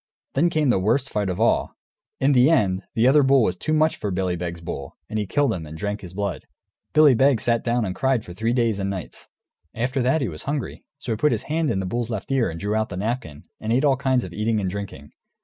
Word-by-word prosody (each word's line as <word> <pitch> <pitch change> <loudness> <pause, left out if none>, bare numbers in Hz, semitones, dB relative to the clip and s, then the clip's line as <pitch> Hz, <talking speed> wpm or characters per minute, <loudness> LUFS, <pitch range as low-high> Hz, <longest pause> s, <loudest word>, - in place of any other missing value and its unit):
Then 165 +6 +3
came 155 -5 +2
the 95 - +2
worst 120 +8 +1
fight 105 -2 -1
of 90 +2 -3
all. 115 - +1 0.4
In 135 +2 +3
the 130 +1 +5
end, 100 - +2
the 115 +2 +4
other 145 +3 +6
bull 135 -2 +4
was 90 - 0
too 125 - -4
much 155 +1 +2
for 105 - -3
Billy 90 -1 -1
Beg's 85 -1 -5
bull, 70 -5 -7
and 110 - -3
he 105 - -2
killed 140 +1 +1
him 80 -5 -6
and 80 +1 -9
drank 105 +3 -3
his 90 -2 -10
blood. 100 -4 -3 0.4
Billy 155 -3 +6
Beg 130 0 +3
sat 115 +1 +1
down 120 -1 +1
and 95 - -3
cried 130 0 0
for 90 - -9
three 110 +5 -1
days 115 -4 +1
and 95 - -1
three 95 - -2
nights. 85 - -12 0.5
After 125 +3 -1
that 130 +6 +2
he 130 - 0
was 75 -4 -7
hungry; 145 -2 -4
so 125 - -5
he 110 - -1
put 150 +6 +2
his - - -1
hand 160 0 -1
in 95 - 0
the 95 - -2
bull's 120 +5 -2
left 110 +4 -5
ear, 135 -3 +2
and 85 0 -6
drew 105 +3 -2
out 110 0 0
the 90 - -6
napkin, 105 - -4 0.2
and 110 - -3
ate 130 +5 +3
all 140 -2 +4
kinds 130 -2 +1
of - - -8
eating 110 +1 0
and 95 -3 -2
drinking. 95 -8 -7
115 Hz, 265 wpm, -23 LUFS, 95-135 Hz, 0.5 s, other